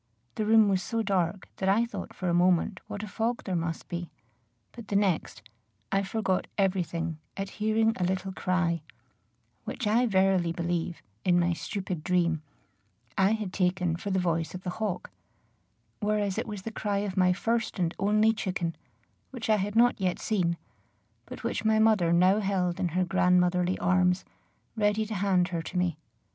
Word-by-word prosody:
The 215 - -2
room 220 -1 +6
was 190 -2 +2
so 230 +1 -2
dark 190 -2 0
that 190 - 0
I 220 +4 +4
thought 205 -5 -7
for 185 - -3
a 175 - +2
moment 175 +1 +3
what 205 - -5
a - - -5
fog 230 +3 -2
there 185 - -2
must 165 -1 -3
be; 175 0 -5 0.6
but 235 -3 -11
the 200 - -2
next, 195 -5 0 0.5
I 195 - +2
forgot 195 -2 -1
every 195 -2 +2
thing 165 -2 -4 0.2
at 195 0 -4
hearing 220 +1 +3
a - - +1
little 190 +1 -1
cry, 180 -3 0 0.8
which 245 - -4
I 230 +4 +3
verily 190 -4 +2
believe, 170 0 -2 0.2
in 175 -1 +4
my 175 0 +2
stupid 185 -2 -4
dream, 170 -3 +1 0.7
I 195 +2 +3
had 210 -4 -3
taken 180 -2 +1
for 190 +4 -5
the 190 - +1
voice 170 -2 0
of 185 - -7
the 180 - -3
hawk; 200 - -2 0.9
whereas 210 -1 0
it 240 - -3
was 205 -3 -6
the 225 - -5
cry 205 -2 -2
of 190 -2 -4
my 185 -1 +4
first 230 +5 -1
and 175 -2 0
only 215 +2 +3
chicken, 180 -5 -2 0.5
which 235 -4 -3
I 215 - +5
had 205 +2 -2
not 235 -2 +4
yet 180 -2 +1
seen, 175 -6 0 0.7
but - - -9
which - - -2
my 220 0 +3
mother 215 -6 +4
now 185 +4 +5
held 190 -4 0
in 180 - +1
her 185 - +3
grandmotherly 180 0 +2
arms, 180 0 +2 0.5
ready 210 0 +1
to 220 - -5
hand 185 -3 +2
her 170 -2 -2
to 175 - -6
me. 175 -4 0
190 Hz, 180 wpm, -28 LUFS, 180-210 Hz, 0.9 s, room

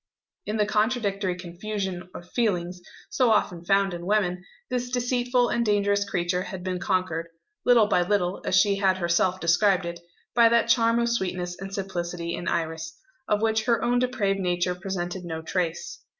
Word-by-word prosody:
In 210 +1 -1
the 210 - +3
contradictory 210 -3 0
confusion 185 +1 -5
of 175 - -9
feelings, 180 -6 -1 0.3
so 255 -3 +3
often 185 -5 +1
found 195 +1 +2
in 175 0 -6
women, 180 -4 +1 0.2
this 245 -1 -2
deceitful 245 0 +1
and 235 - +1
dangerous 200 -1 +1
creature 180 0 0
had 185 -1 -6
been 185 -1 -2
conquered 170 -3 -1 0.4
little 240 -3 +6
by 180 - +2
little, 180 0 0
as - - 0
she 200 0 +3
had 190 -1 +2
herself 180 +1 +1
described 180 +2 +3
it 170 0 -5 0.3
by 235 -1 +6
that 235 0 +2
charm 230 -1 +4
of 235 0 +2
sweetness 180 -5 -2
and 195 0 -6
simplicity 175 -3 -4
in 175 - -5
Iris, 160 -1 -2 0.3
of 210 +1 +1
which 220 0 +1
her 235 -1 +2
own 245 0 +2
depraved 215 -6 0
nature 180 -1 0
presented 180 0 -4
no 160 -2 -5
trace. 170 0 -3
190 Hz, 170 wpm, -26 LUFS, 175-220 Hz, 0.4 s, little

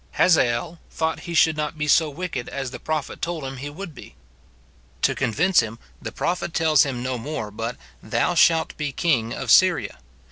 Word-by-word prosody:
Hazael 160 0 +2
thought 160 0 -2
he 170 - -3
should 160 -1 +4
not 150 +1 -3
be 150 0 -2
so 155 +1 +4
wicked 155 -5 -5
as 135 -2 -4
the - - -8
prophet 155 -3 -4
told 170 -3 -3
him 135 0 -6
he 140 +3 -6
would 170 +2 -8
be. 130 - -13 0.9
To - - +3
convince 180 - +2
him, 115 -1 -2 0.2
the 115 - -5
prophet 170 +5 -2
tells 160 -1 +4
him 130 -4 -1
no 130 -1 -2
more 115 -5 -5
but, 115 +3 -4
*' - - -29
Thou - - 0
shalt 165 -1 +3
be 150 -1 -2
king 130 -8 0
of - - -2
Syria." 65 - +4
150 Hz, 190 wpm, -23 LUFS, 125-160 Hz, 0.9 s, should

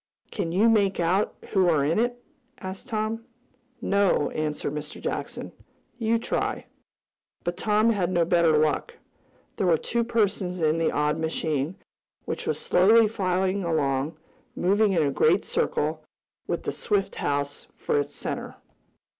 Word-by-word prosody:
"Can 165 - -2
you 200 +6 +4
make 200 -4 +3
out 180 +4 +1 0.2
who 190 -3 +4
are 150 -4 +3
in 160 +7 +1
it?" 245 +1 -1 0.4
asked 190 +5 -7
Tom. 220 -1 -2 0.6
"No," 200 -7 +2
answered 150 -2 -2
Mr. 150 0 -6
Jackson. - - -4 0.5
"You 230 0 +2
try." 230 - -2 0.8
But 175 - -2
Tom 215 +3 +2
had 190 -5 0
no 170 -2 +2
better 170 -2 +4
luck. 155 -1 0 0.6
There 185 - +1
were 165 -2 +5
two 235 +8 -1
persons 205 -6 0
in 160 0 +2
the 165 - +2
odd 150 +2 0
machine, 160 0 -1 0.5
which - - -4
was - - 0
slowly 220 +5 +5
flying 190 -2 0
along, 150 -2 0 0.4
moving 200 +3 +2
in 165 -4 +3
a 140 - +1
great - - +3
circle, 155 +1 -1 0.4
with - - -2
the - - -2
Swift 205 -3 -1
house 145 0 -2
for - - 0
its 145 0 -4
center. - - -5
180 Hz, 145 wpm, -26 LUFS, 155-210 Hz, 0.8 s, were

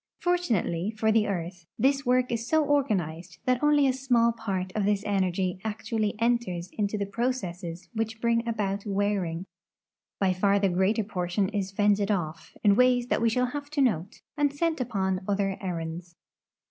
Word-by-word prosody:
Fortunately 225 - 0
for 220 0 +2
the 215 -1 +3
earth, 175 -2 -4
this 275 0 +2
work 250 0 +3
is 230 0 -2
so 315 -1 +3
organized 185 - -1
that 255 -1 +2
only 295 -1 +4
a 265 - +3
small 245 -3 +2
part 195 -5 -3
of 215 - 0
this 205 0 +1
energy 185 -2 0
actualh' 220 0 -2
enters 225 -7 0
into 210 0 -1
the 200 - -1
j)rocesses 190 -6 -3
which 225 0 -2
bring 235 0 +1
about 205 -3 -1
wearing. 195 -4 -1 0.7
By 190 -2 +2
far 200 +2 +2
the 200 -1 +2
greater 190 +5 +2
portion 190 -1 -1
is 200 -3 -2
fended 205 0 +2
off, 170 -6 -3
in 200 -1 +5
ways 245 0 +3
that - - +1
we 230 - +4
shall 250 +2 0
have 290 0 -5
to 300 -2 0
note, 200 -4 -1
and 290 -2 +2
sent 320 0 -1
upon 190 -6 -1
other 195 -1 0
errands. 170 -1 -5
205 Hz, 170 wpm, -27 LUFS, 185-240 Hz, 0.7 s, in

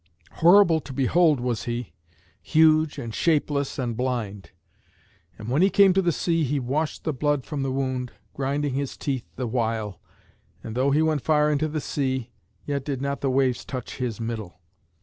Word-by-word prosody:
Horrible 175 -1 +5
to 135 - -9
behold 150 +3 +3
was 120 -2 -2
he, 120 -7 -4 0.5
huge 155 -1 +3
and 115 -2 -5
shapeless 145 -2 0
and 120 -4 -2
blind. 110 -7 -3 0.9
And 110 - -9
when 135 +7 +1
he 190 - +5
came 200 -1 +5
to 195 - +3
the 175 -2 +2
sea 165 0 0
he 145 +1 0
washed 145 +5 -2
the 155 - -1
blood 145 0 0
from 150 -3 -4
the 135 -1 -1
wound, 130 -2 -2 0.2
grinding 140 +1 -1
his 140 0 -3
teeth 135 -4 -3
the 130 - -3
while, 110 -4 -2 0.6
and 110 - -6
though 130 +4 +1
he 150 +3 +3
went 155 -3 +1
far 150 +2 +3
into 150 +1 +1
the 155 0 -3
sea, 130 -5 -2 0.3
yet 140 -2 -2
did 135 -2 -3
not 140 +1 -3
the 135 - +1
waves 130 -2 +1
touch 130 -4 -6
his 125 -4 -3
middle. 110 -6 -5
135 Hz, 180 wpm, -25 LUFS, 125-150 Hz, 0.9 s, Horrible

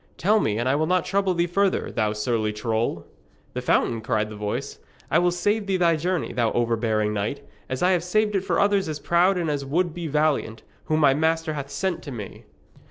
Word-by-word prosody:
'Tell 210 +5 +3
me, 105 - 0
and 120 +2 -1
I 130 - +3
will 155 +2 +1
not 180 0 +1
trouble 195 -2 +1
thee 170 0 +2
further, 190 +2 0
thou 110 -1 0
surly 110 0 -1
troll.' 110 -5 -2 0.5
'The - - -3
fountain?' 115 -1 +1
cried 110 0 -1
the - - -7
voice. 105 +7 -4 0.3
'I - - +5
will 175 0 +3
save 205 +4 0
thee 190 -1 +1
thy 170 -2 +3
journey, 175 +1 -2
thou 115 -1 +1
overbearing 110 -2 0
knight, 105 +6 -3 0.2
as 130 +3 -2
I 180 - +4
have 175 -2 +1
saved 210 +3 +1
it 195 - +2
for 180 -4 0
others 200 -3 +2
as 150 -1 -4
proud 180 +5 +3
and 170 -2 -1
as 145 -2 -1
would 165 +5 0
be 170 -1 -5
valiant, 150 -7 0 0.2
whom 155 0 +1
my 140 -2 +6
master 160 +2 0
hath 140 -2 -5
sent 190 +3 -2
to 145 - -8
me!' 105 -5 -8
155 Hz, 220 wpm, -24 LUFS, 115-180 Hz, 0.5 s, my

